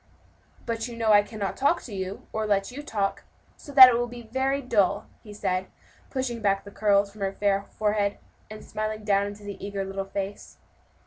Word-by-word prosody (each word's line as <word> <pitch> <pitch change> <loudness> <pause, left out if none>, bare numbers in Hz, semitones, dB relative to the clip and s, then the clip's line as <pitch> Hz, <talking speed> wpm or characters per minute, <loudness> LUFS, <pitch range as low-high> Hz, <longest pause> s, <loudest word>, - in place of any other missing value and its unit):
"But 230 0 -2
you 235 -1 -8
know 225 -1 +2
I 205 -1 +8
cannot 205 -2 -4
talk 285 +5 +2
to 230 - -9
you, 190 0 -5
or 220 0 -1
let 200 +1 +1
you 275 +4 -7
talk; 205 -8 -2 0.3
so 285 - -12
that 260 -2 +12
it 250 - +3
will 240 +1 0
be 240 0 -9
very 265 +4 0
dull," 230 -8 +1 0.2
he 210 - -12
said, 185 -2 -2 0.4
pushing 255 -4 -3
back 195 -1 +1
the 200 - -11
curls 200 -1 +2
from 210 0 -14
the 195 0 -1
fair 200 -1 0
forehead, 210 -1 +1 0.3
and 215 0 -10
smiling 215 0 -4
down 200 -1 +2
into 205 0 -9
the 200 -1 -8
eager 200 -1 -3
little 195 0 -4
face. 195 +1 -6
210 Hz, 200 wpm, -26 LUFS, 200-230 Hz, 0.4 s, that